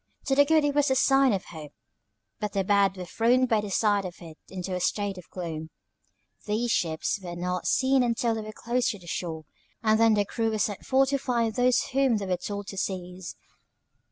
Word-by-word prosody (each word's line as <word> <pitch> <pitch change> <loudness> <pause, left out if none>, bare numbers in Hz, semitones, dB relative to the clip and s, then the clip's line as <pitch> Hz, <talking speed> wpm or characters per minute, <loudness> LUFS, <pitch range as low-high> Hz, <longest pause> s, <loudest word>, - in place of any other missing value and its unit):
To 270 - +1
the 285 +1 +6
good 310 0 +3
it 290 - +1
was 290 0 +2
a 265 - +2
sign 270 0 +4
of 195 -2 -2
hope, 155 -3 -10 0.7
but 210 -1 -3
the 195 - +1
bad 195 -1 +2
were 180 - -5
thrown 240 +7 +2
by 225 -4 +2
the 210 - -6
sight 205 0 +2
of 180 -2 -6
it 160 -2 -12
into 185 0 -5
a 180 - -1
state 200 +1 -1
of 180 - -15
gloom. 160 -3 -6 0.8
These 225 +3 0
ships 160 +2 0
were 175 -2 -6
not 180 +1 -3
seen 265 0 +3
till 230 0 0
they 220 - -3
came 215 0 -7
close 240 +2 -1
to 210 - -3
the 180 - -16
shore, 165 -2 -4 0.4
and 220 0 +3
then 225 -1 +5
the 205 -1 +1
crew 225 +2 -1
were 220 - -1
sent 205 -1 -2
forth 270 0 +3
to 275 0 0
find 235 -4 0
those 250 +2 +2
whom 265 -4 +3
they 200 - -4
were 185 -1 0
told 205 +2 -5
to 195 - -8
seize. 180 -2 -4
210 Hz, 220 wpm, -27 LUFS, 180-245 Hz, 0.8 s, the